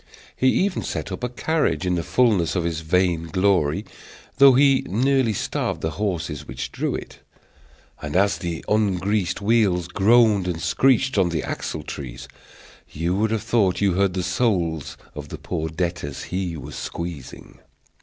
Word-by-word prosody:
He 130 - +1
even 190 +6 +1
set - - -4
up - - -6
a 125 - 0
carriage 150 - 0
in 90 - +1
the 85 - 0
fulness 100 -3 +2
of 90 - 0
his 85 -2 -2
vain 85 0 +1
glory, 90 -4 +1 0.5
though 135 -1 +9
he 135 0 +4
nearly 130 +3 +2
starved 100 - -2
the 80 - -1
horses 85 -8 -3
which - - -5
drew - - -2
it; - - -8 0.8
and, 75 +2 -5
as 100 +2 +3
the 85 -2 -5
ungreased 100 -2 0
wheels 100 -5 +2
groaned 105 0 +4
and 85 -2 -2
screeched 130 +8 +2
on 90 -2 +3
the 80 -3 -2
axle 80 - -4
trees, 65 -5 -7 0.6
you 85 +4 -2
would 110 +3 +1
have 110 -1 -1
thought 110 -6 +1
you 100 -2 +2
heard 95 0 +1
the 90 - -1
souls 85 - -1 0.2
of - - -8
the - - -6
poor 80 -3 -4
debtors 80 -3 -3
he 90 -2 -3
was - - -9
squeezing. 85 -6 -7
95 Hz, 165 wpm, -23 LUFS, 85-110 Hz, 0.8 s, though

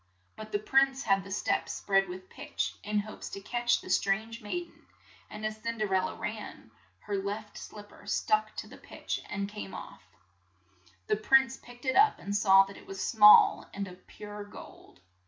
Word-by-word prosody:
But 215 0 -9
the - - +1
CINDERELLA 215 +6 -3
103 270 - +6
prince 270 0 -8
had 195 - +3
had 195 - -7
the 195 - -10
steps 205 - -1
spread 195 -1 +1
with 185 +1 -9
pitch, - - -4
in 210 0 0
hopes 215 +1 -8
to - - -7
catch 240 +4 0
the - - -11
strange 220 +6 0
maid 345 +12 -3
en - - -25 0.5
and 210 0 -7
as 215 0 -3
Cin 230 +1 -3
der 210 -3 -1
el 185 0 +3
la - - -8
ran, 210 - -6 0.3
her 205 - -3
left 205 +2 -5
slip 205 -1 -10
per - - -17
stuck 215 +1 +1
to - - -6
the - - -13
pitch - - -5
and 200 -1 -3
came 210 -1 -8
off. - - -9 1.0
The 210 - +1
prince 265 +4 +4
picked 245 +2 -15
it 260 - +1
up 425 +1 +5
and 200 +1 -4
saw 195 -1 +6
that 195 0 -10
it - - -15
was 195 0 -7
small 210 -2 +7
and 200 0 -3
of 180 0 -14
pure 205 0 -8
gold. 205 - -14
210 Hz, 210 wpm, -30 LUFS, 195-220 Hz, 1.0 s, small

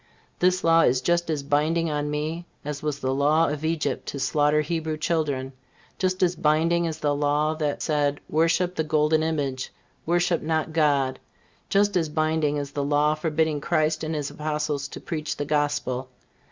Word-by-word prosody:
This 185 +1 +2
law 165 0 +5
is 125 -3 +3
just 170 +5 0
as 150 -3 -1
binding 155 +3 +1
on 150 0 -1
me 155 +4 -3 0.2
as 150 -1 -4
was 150 -2 -2
the 130 -2 -1
law 150 +4 +3
of 150 +1 -4
Egypt 160 -1 -1
to 140 - -4
slaughter 150 +3 +2
Hebrew 160 0 -2
children; 145 -5 -1 0.5
just 185 0 +1
as 180 0 +2
binding 165 +2 +2
as 160 -1 -4
the 145 -2 0
law 145 +2 +1
that 150 -2 -2
said, 145 -2 0
Worship 165 +3 +2
the 160 - -1
golden 155 0 +2
image, 145 -5 -2 0.4
worship 175 0 +2
not 160 0 -1
God; 145 -4 +2 0.5
just 205 0 +2
as 165 -4 +1
binding 155 -1 0
as 140 -1 -4
the 145 0 -2
law 145 +1 +2
forbidding 155 -1 0
Christ 155 0 +1
and 160 0 -2
his 145 -2 -3
Apostles 150 -2 -2
to - - -9
preach 155 -3 -4
the 145 - -2
Gospel. 145 -3 -1
155 Hz, 175 wpm, -25 LUFS, 145-160 Hz, 0.5 s, law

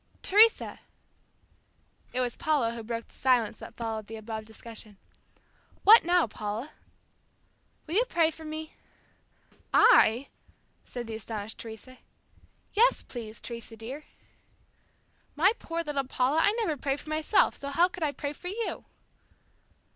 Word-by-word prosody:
"Teresa!" 435 +3 +4 1.3
It 255 - -1
was 245 -1 -1
Paula 300 -8 +1
who 235 - -6
broke 230 +1 -5
the - - -22
silence 250 -5 +1
that - - -11
followed 220 -2 -4
the 225 - -7
above 220 0 -6
discussion. 220 -2 -9 0.9
"What 445 +3 +9
now, 350 +1 +3
Paula?" 215 +5 -5 1.1
"Will 320 - -5
you 460 +6 +4
pray 330 -2 +3
for 320 - -12
me?" 310 0 -6 1.0
"I," 240 +5 +5 0.6
said 245 -1 -6
the 225 - -6
astonished 220 -1 -6
Teresa. 230 +3 -10 0.7
"Yes, 465 +4 +4
please, 225 -3 -8
Teresa 235 -1 -8
dear." 260 +7 -7 1.3
"My 355 +7 +5
poor 335 0 -3
little 285 -3 -2
Paula, 260 +4 +1
I 405 - +4
never 435 -10 -1
pray 275 +1 -1
for 305 - -9
myself, 310 +6 +2
so 280 - -6
how 335 +6 +4
could 365 -1 -11
I 305 -2 +1
pray 285 0 -5
for 355 - -9
you?" 440 +5 -4
270 Hz, 140 wpm, -28 LUFS, 225-320 Hz, 1.3 s, What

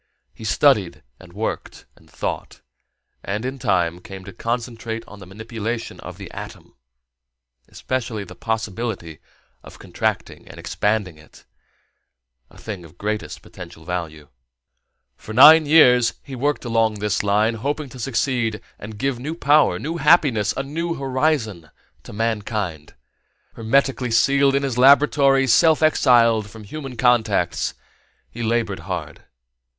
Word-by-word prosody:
He - - -11
studied - - +2 0.2
and 90 - -15
worked 105 +5 -5
and - - -23
thought, - - -5 0.6
and 105 +4 -3
in 130 +1 -4
time 90 -7 0
came 95 -2 -10
to - - -10
concentrate 115 -1 -4
on 105 - -12
the 95 - -12
manipulation 110 +3 -5
of - - -9
the - - -10
atom, - - -10 0.9
especially 115 -5 -4
the 95 - -11
possibility 110 - -4 0.4
of - - -14
contracting - - -4
and - - -12
expanding 105 -6 -2
it 75 - -19 1.0
a - - -19
thing 100 -5 -7
of 80 0 -16
greatest 105 0 -4
potential 85 -3 -12
value. 80 -4 -5 0.9
For 110 - -9
nine 150 +5 +8
years 125 -6 +5
he 135 - -8
worked 145 +2 -1
along 115 -2 +1
this 105 -2 -1
line, 105 +3 +2
hoping 140 +6 -3
to 125 - -12
succeed 120 -3 -1 0.2
and 105 +1 -9
give 135 +2 -2
new 150 +6 -5
power, 150 -2 +3
new 165 +4 -4
happiness, 140 - +3
a 135 - -1
new 165 +4 -3
horizon 130 - -1 0.3
to - - -12
mankind. 105 -7 -3 0.6
Hermetically 125 +2 0
sealed 140 +4 +3
in 140 - +1
his 130 -3 -2
laboratory, 140 0 +5
self 160 +5 +4
exiled 115 -8 +4
from 110 0 -12
human 135 +3 -8
contacts, 110 -8 +1 0.6
he 120 - -8
labored 115 -3 -1
hard. - - -6
115 Hz, 135 wpm, -21 LUFS, 105-135 Hz, 1.0 s, nine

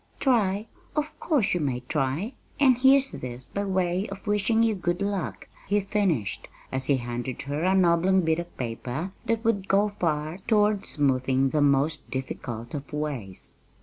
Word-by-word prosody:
"Try? 215 -6 +2 0.3
Of 300 0 -2
course 290 - +2
you 175 - +1
may 130 -5 -1
try! 150 - -1 0.3
And 265 -3 +6
here's 270 +1 +5
this 125 0 -6
by 200 0 -1
way 185 +1 0
of 195 0 -8
wishing 210 +2 +2
you 225 -1 +3
good 175 -2 -1
luck," 200 -2 -3 0.2
he 205 +1 +3
finished, 190 - -1 0.2
as 130 0 -2
he 140 - +4
handed 120 0 -4
her 145 +2 -3
an 190 0 +4
oblong 175 +3 +4
bit 160 -1 +1
of 170 0 -7
paper 125 +8 -4 0.2
that 230 0 0
would 200 -4 +1
go 200 +2 +3
far 155 +1 -1
toward 210 -2 +3
smoothing 135 -2 +2
the 150 - +2
most 140 +2 +2
difficult 120 -3 -5
of 145 -1 -6
ways. 140 -11 -3
175 Hz, 165 wpm, -26 LUFS, 135-205 Hz, 0.3 s, And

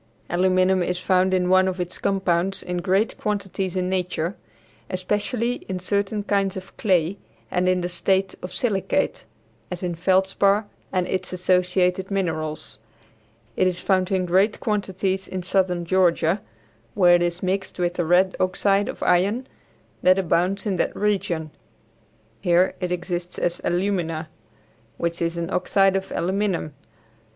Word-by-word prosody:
Aluminum 185 +1 +3
is 180 0 -1
found 185 +1 +2
in 185 -1 +2
one 185 +1 +4
of 185 0 -2
its 180 0 -4
compounds 190 -1 0
in 180 0 -3
great 195 +4 +1
quantities 195 -3 -2
in 180 -1 0
nature, 180 -1 -1 0.5
especially 210 +6 -1
in 185 - -2
certain 200 +3 -1
kinds 195 -2 0
of 190 0 -10
clay 185 -2 +1 0.3
and 180 0 +2
in 180 -1 +1
a - - 0
state 190 +2 +1
of 180 - -6
silicate, 215 -7 -1 0.4
as 180 0 -6
in 175 -1 -1
feldspar 190 +4 +2 0.3
and 185 -1 +1
its 185 -1 -2
associated 180 +1 +1
minerals. 165 -6 -3 0.8
It 185 - +3
is 180 -1 -1
found 185 0 +1
in 185 -1 +1
great 190 +4 +2
quantities 195 -2 -1
in 185 -1 -5
southern 180 -2 +1
Georgia, 175 0 +2 0.5
where 180 -2 +6
it 175 - +5
is 175 +1 -1
mixed 190 +1 -2
with 175 -1 0
the 175 - -1
red 180 +3 +3
oxide 195 +2 +2
of - - -5
iron 200 +8 +2 0.6
that 185 +1 +5
abounds 190 +2 +1
in 195 -3 0
that - - 0
region. 180 -6 -1 0.9
Here, 175 +4 +3
it 180 -1 -3
exists 175 0 -3
as 175 0 -1
alumina, 175 -4 -1 0.7
which 170 0 -2
is 170 0 -1
an 170 +2 -3
oxide 195 +1 +3
of 195 0 -2
aluminum. 185 -3 -1
185 Hz, 145 wpm, -23 LUFS, 175-195 Hz, 0.9 s, where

